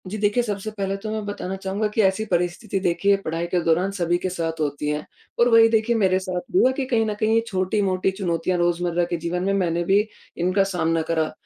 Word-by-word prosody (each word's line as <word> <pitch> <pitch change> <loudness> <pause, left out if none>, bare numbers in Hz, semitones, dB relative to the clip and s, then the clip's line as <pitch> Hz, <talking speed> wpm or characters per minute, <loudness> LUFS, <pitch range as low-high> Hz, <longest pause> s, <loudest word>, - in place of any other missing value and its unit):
जी 205 +4 -4
देखिए, 210 +3 +2
सबसे 210 -1 -4
पहले 195 0 -1
तो 215 +2 -6
मैं 215 -1 -3
बताना 200 -2 -4
चाहूँगा 195 +2 -2
कि 210 +1 0
ऐसी 190 +1 +2
परिस्थिति 180 +2 -1
देखिए 185 +2 +2
पढ़ाई 165 +2 -2
के 180 +1 0
दौरान 175 +4 +2
सभी 175 -3 0
के 185 - -3
साथ 165 -3 -3
होती 145 -1 -2
है 150 0 -2 0.3
और 235 - +5
वही 230 -1 +7
देखिए 225 +1 +2
मेरे 190 -4 +2
साथ 185 -1 -3
भी 365 - +3
हुआ 260 - +5
कि 275 - -1
कहीं 230 -3 +1
न 215 - -1
कहीं 215 +1 +2
ये 230 - +4
छोटी-मोटी 190 -1 0
चुनौतियाँ 180 -2 -1
रोज़मर्रा 175 0 +1
के 175 - -1
जीवन 170 +2 -3
में 195 +1 +1
मैंने 175 -3 0
भी 195 +3 +3 0.4
इनका 185 +3 +2
सामना 165 -4 0
करा। 160 -2 0
190 Hz, 225 wpm, -23 LUFS, 175-205 Hz, 0.4 s, वही